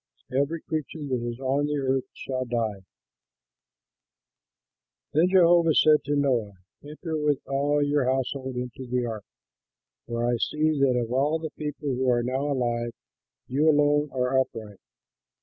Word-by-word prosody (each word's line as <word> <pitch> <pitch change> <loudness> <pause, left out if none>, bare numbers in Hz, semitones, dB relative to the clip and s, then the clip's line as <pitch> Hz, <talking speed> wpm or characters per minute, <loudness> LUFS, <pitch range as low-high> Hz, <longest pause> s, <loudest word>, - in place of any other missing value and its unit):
Every 145 +4 0
creature 155 0 -4
that 120 -2 -1
is 120 - -9
on 135 +2 0
the 150 0 -1
earth 135 -1 0
shall 130 -1 -3
die." 115 -5 -2 2.3
Then 165 +4 +4
Jehovah 170 -3 +5
said 155 -1 +5
to 145 +1 0
Noah, 125 -8 +1 0.3
"Enter 155 +2 -5
with 150 -2 +2
all 145 +2 +1
your 145 -2 +1
household 130 0 -1
into 125 +1 -5
the 125 0 0
ark, 110 -4 -5 0.8
for 120 0 -2
I 120 0 +1
see 155 +4 0
that 130 -3 +3
of 120 -1 -3
all 145 +5 +2
the 160 -1 -6
people 150 -1 -5
who 130 0 0
are 120 -1 +2
now 135 +4 -1
alive 120 -3 -1 0.5
you 145 +5 +2
alone 145 0 +3
are 130 0 +1
upright. 110 -6 -4
135 Hz, 150 wpm, -26 LUFS, 125-150 Hz, 2.3 s, Jehovah